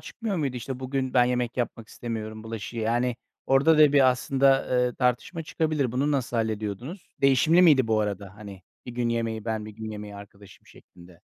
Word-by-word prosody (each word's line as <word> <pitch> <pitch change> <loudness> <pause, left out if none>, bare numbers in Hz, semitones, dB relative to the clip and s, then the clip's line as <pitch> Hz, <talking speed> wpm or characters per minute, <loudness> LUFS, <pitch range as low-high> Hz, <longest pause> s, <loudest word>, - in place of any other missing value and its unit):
çıkmıyor 225 -5 -5
muydu? 140 -6 -2
İşte, 130 +1 -6
"Bugün 130 0 -3
ben 125 -1 +6
yemek 125 -1 -1
yapmak 115 -2 -3
istemiyorum 110 -2 -6
bulaşığı." 115 +1 -7
Yani 120 +2 0 0.3
orada 145 +4 +4
da 150 -2 +6
bir 135 -3 +6
aslında 135 +1 +2 0.3
tartışma 135 +8 0
çıkabilir. 155 -6 -1
Bunu 135 +4 0
nasıl 125 -3 -1
hallediyordunuz? 110 - -4
Değişimli 145 +6 +4
miydi 145 -8 +5
bu 110 -1 +2
arada, 100 -2 -4
hani, 100 -3 -11 0.2
bir 125 - -6
gün 120 0 -1
yemeği 115 -2 -2
ben, 110 -2 -3
bir 110 - -8
gün 110 +1 -8
yemeği 105 -1 -8
arkadaşım, 100 -1 -15
şeklinde? 90 -1 -18
120 Hz, 175 wpm, -26 LUFS, 110-135 Hz, 0.3 s, ben